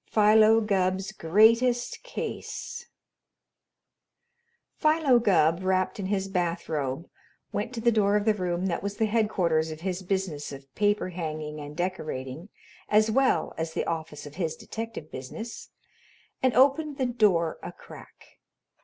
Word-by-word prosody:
PHILO 215 Hz, +1 st, +5 dB
GUBB'S 190 Hz, -2 st, 0 dB
GREATEST 230 Hz, +7 st, +3 dB
CASE -, -, -6 dB, 1.9 s
Philo 305 Hz, -5 st, +3 dB
Gubb, 170 Hz, -6 st, +3 dB
wrapped 185 Hz, +1 st, 0 dB
in 190 Hz, -, -3 dB
his 195 Hz, -1 st, -1 dB
bathrobe, 165 Hz, -5 st, -2 dB, 0.4 s
went 210 Hz, +3 st, -3 dB
to 230 Hz, -, -4 dB
the 235 Hz, +1 st, +4 dB
door 205 Hz, -2 st, +3 dB
of 210 Hz, 0 st, +1 dB
the 220 Hz, -, +4 dB
room 180 Hz, -2 st, -2 dB
that 180 Hz, -, -1 dB
was 200 Hz, 0 st, -4 dB
the 220 Hz, -, +2 dB
headquarters 185 Hz, -8 st, +1 dB
of 155 Hz, 0 st, -8 dB
his 185 Hz, 0 st, -3 dB
business 185 Hz, -6 st, -3 dB
of 135 Hz, -1 st, -11 dB
paper 205 Hz, -2 st, +1 dB
hanging 155 Hz, -3 st, -5 dB
and 145 Hz, +1 st, -9 dB
decorating 160 Hz, -3 st, -4 dB, 0.4 s
as 215 Hz, +1 st, +4 dB
well 265 Hz, +3 st, +2 dB
as 160 Hz, 0 st, -3 dB
the -, -, -1 dB
office 160 Hz, -3 st, -4 dB
of 145 Hz, +2 st, -11 dB
his 165 Hz, -4 st, -1 dB
detective 225 Hz, -8 st, -7 dB
business, 220 Hz, -, -7 dB, 0.7 s
and 255 Hz, -3 st, +2 dB
opened 280 Hz, +3 st, +3 dB
the 260 Hz, -, 0 dB
door 205 Hz, -9 st, +2 dB
a -, -, -6 dB
crack. -, -, -15 dB
190 Hz, 140 wpm, -27 LUFS, 165-220 Hz, 1.9 s, PHILO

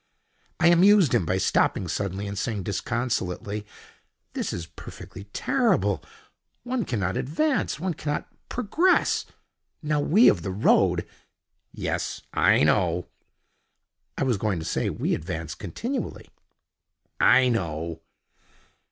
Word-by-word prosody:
I 170 Hz, -, +5 dB
amused 180 Hz, -, +5 dB
him 85 Hz, -, +2 dB
by 95 Hz, -, +1 dB
stopping 95 Hz, 0 st, +1 dB
suddenly 95 Hz, +3 st, -3 dB
and 100 Hz, 0 st, -5 dB
saying 110 Hz, -1 st, -2 dB
disconsolately, 105 Hz, -1 st, -2 dB, 0.7 s
"This -, -, -2 dB
is 85 Hz, -, -4 dB
perfectly 95 Hz, +3 st, -11 dB
terrible. 100 Hz, -, +1 dB, 0.6 s
One 245 Hz, -2 st, -2 dB
cannot 95 Hz, -5 st, -1 dB
advance: 255 Hz, -, 0 dB
one 180 Hz, +1 st, -1 dB
cannot 150 Hz, -1 st, -3 dB, 0.2 s
progress. 310 Hz, -, +2 dB, 0.6 s
Now 150 Hz, 0 st, +1 dB
we 195 Hz, +11 st, +5 dB
of 85 Hz, -, +4 dB
the 95 Hz, -, -4 dB
road——" 95 Hz, +4 st, +2 dB, 0.6 s
"Yes. -, -, -3 dB
I -, -, +4 dB
know." -, -, +1 dB, 1.1 s
"I -, -, 0 dB
was 125 Hz, -5 st, +1 dB
going 105 Hz, -2 st, -1 dB
to 80 Hz, -, -5 dB
say, -, -, -1 dB
we -, -, -1 dB
advance 80 Hz, -2 st, -4 dB
continually." 250 Hz, 0 st, -5 dB, 0.9 s
"I 130 Hz, 0 st, +6 dB
know." 85 Hz, -6 st, -2 dB
105 Hz, 115 wpm, -25 LUFS, -, 1.1 s, I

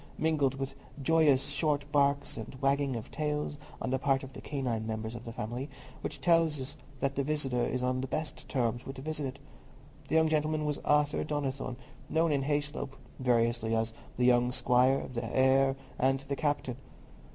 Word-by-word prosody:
mingled 150 Hz, -4 st, +2 dB
with 135 Hz, 0 st, -4 dB, 0.3 s
joyous 145 Hz, -3 st, +4 dB
short 145 Hz, 0 st, +1 dB
barks 140 Hz, -1 st, +2 dB
and 115 Hz, +3 st, -7 dB
wagging 140 Hz, -1 st, +2 dB
of 115 Hz, -, -6 dB
tails 150 Hz, -1 st, -2 dB, 0.2 s
on -, -, -2 dB
the 130 Hz, -, +1 dB
part 135 Hz, 0 st, +2 dB
of 135 Hz, 0 st, -9 dB
the -, -, -8 dB
canine 125 Hz, -6 st, -2 dB
members 110 Hz, 0 st, -3 dB
of 120 Hz, 0 st, -7 dB
the 115 Hz, -, -5 dB
family, 120 Hz, +5 st, -4 dB, 0.3 s
which -, -, -4 dB
tells 160 Hz, -6 st, +2 dB, 0.3 s
that 135 Hz, 0 st, +1 dB
the 140 Hz, -, 0 dB
visitor 135 Hz, -4 st, 0 dB
is 125 Hz, 0 st, -1 dB
on 130 Hz, 0 st, +1 dB
the 135 Hz, -, -3 dB
best 155 Hz, +4 st, -4 dB
terms 120 Hz, -2 st, 0 dB
with 135 Hz, -, -7 dB
the 130 Hz, -, -7 dB
visited. 145 Hz, -3 st, -3 dB, 0.7 s
The -, -, 0 dB
young 160 Hz, 0 st, +5 dB
gentleman 155 Hz, 0 st, +1 dB
was 150 Hz, -1 st, -1 dB
Arthur 150 Hz, 0 st, +2 dB
Donnithorne, 135 Hz, -4 st, -2 dB, 0.3 s
known 160 Hz, 0 st, +3 dB
in 140 Hz, -2 st, +2 dB
Hayslope, 145 Hz, -1 st, -2 dB, 0.2 s
variously, 115 Hz, -2 st, +2 dB
as 110 Hz, 0 st, 0 dB, 0.2 s
"the 125 Hz, -, +3 dB
young 125 Hz, 0 st, +5 dB
squire," 125 Hz, +2 st, +3 dB
"the 120 Hz, -1 st, -4 dB
heir," 135 Hz, +3 st, +4 dB, 0.2 s
and 135 Hz, +1 st, +3 dB
"the 140 Hz, 0 st, -3 dB
captain." 145 Hz, -4 st, -1 dB
135 Hz, 175 wpm, -31 LUFS, 125-145 Hz, 0.7 s, young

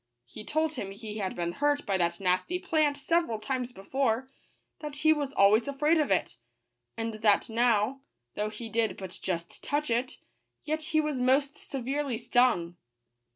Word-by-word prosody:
He 170 Hz, -, -10 dB
told 315 Hz, +6 st, 0 dB
him 205 Hz, -9 st, -5 dB
he 210 Hz, +2 st, -7 dB
had 190 Hz, -2 st, -2 dB
been 170 Hz, -1 st, -2 dB
hurt 290 Hz, +7 st, 0 dB
by 195 Hz, -, 0 dB
that 170 Hz, 0 st, 0 dB
nasty 185 Hz, -, +1 dB
plant 310 Hz, -6 st, +1 dB
several 330 Hz, -5 st, +1 dB
times 250 Hz, +3 st, -3 dB
before; 245 Hz, +3 st, -1 dB, 0.5 s
that 300 Hz, -2 st, -6 dB
he 315 Hz, +2 st, +4 dB
was 290 Hz, -3 st, -2 dB
always 210 Hz, +5 st, +5 dB
afraid 300 Hz, +4 st, +2 dB
of 300 Hz, -, +1 dB
it; -, -, 0 dB, 0.6 s
and 225 Hz, 0 st, -2 dB
that 210 Hz, 0 st, +3 dB
now, 235 Hz, +2 st, +2 dB, 0.3 s
though 210 Hz, +1 st, -2 dB
he 220 Hz, +2 st, -7 dB
did 225 Hz, 0 st, 0 dB
but 190 Hz, -2 st, -8 dB
just 170 Hz, -2 st, -4 dB
touch 295 Hz, -2 st, -1 dB
it, 240 Hz, +3 st, 0 dB, 0.5 s
yet 310 Hz, +1 st, -2 dB
he 310 Hz, -, +1 dB
was 300 Hz, -4 st, -1 dB
most 270 Hz, +3 st, +2 dB
severely 270 Hz, -1 st, -2 dB
stung. 235 Hz, -8 st, +2 dB
245 Hz, 165 wpm, -29 LUFS, 210-290 Hz, 0.6 s, always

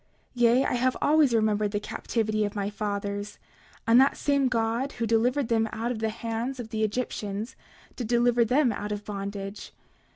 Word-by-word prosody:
29:12 245 Hz, -, -5 dB
Yea, 240 Hz, +3 st, +5 dB
I -, -, 0 dB
have 255 Hz, +1 st, +1 dB
always 300 Hz, -3 st, +4 dB
remembered 215 Hz, -2 st, +2 dB
the 205 Hz, 0 st, -2 dB
captivity 215 Hz, 0 st, -1 dB
of 205 Hz, 0 st, -3 dB
my 200 Hz, 0 st, -2 dB
fathers; 205 Hz, 0 st, -4 dB, 0.5 s
and 235 Hz, +2 st, +6 dB
that 270 Hz, -, +3 dB
same 280 Hz, -2 st, +2 dB
God 235 Hz, +2 st, -1 dB
who 230 Hz, -, -2 dB
delivered 235 Hz, +4 st, +2 dB
them 225 Hz, -1 st, +1 dB
out 230 Hz, +2 st, -2 dB
of 235 Hz, -, -4 dB
the 220 Hz, 0 st, 0 dB
hands 230 Hz, +3 st, -4 dB
of 230 Hz, -2 st, -6 dB
the 220 Hz, 0 st, -3 dB
Egyptians 215 Hz, -1 st, -3 dB, 0.4 s
did 240 Hz, -, -4 dB
deliver 240 Hz, 0 st, +3 dB
them 250 Hz, +2 st, +3 dB
out 210 Hz, 0 st, -4 dB
of 205 Hz, 0 st, -4 dB
bondage. 200 Hz, 0 st, -6 dB
225 Hz, 185 wpm, -27 LUFS, 210-245 Hz, 0.5 s, and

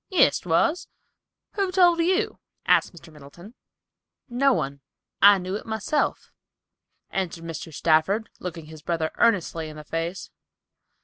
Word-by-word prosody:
"Yes, 355 Hz, -, +4 dB
'twas; 180 Hz, -, +1 dB, 0.6 s
who 390 Hz, -2 st, -1 dB
told 355 Hz, -2 st, +4 dB
you?" 380 Hz, +6 st, +1 dB, 0.3 s
asked -, -, +3 dB
Mr. 165 Hz, -2 st, -15 dB
Middleton. 155 Hz, +8 st, -14 dB, 0.7 s
"No 270 Hz, +3 st, +2 dB
one. 140 Hz, -, -2 dB, 0.4 s
I 200 Hz, 0 st, +8 dB
knew 185 Hz, 0 st, -5 dB
it 210 Hz, -, -6 dB
myself," 220 Hz, +7 st, -2 dB, 0.8 s
answered 175 Hz, -3 st, -3 dB
Mr. 165 Hz, -1 st, -7 dB
Stafford, 160 Hz, -, +1 dB
looking 170 Hz, -3 st, -7 dB
his 155 Hz, 0 st, -12 dB
brother 160 Hz, 0 st, -2 dB
earnestly 170 Hz, -8 st, +1 dB
in 155 Hz, -, -11 dB
the 150 Hz, -, -9 dB
face. 165 Hz, +4 st, -4 dB
180 Hz, 130 wpm, -24 LUFS, 160-240 Hz, 0.8 s, I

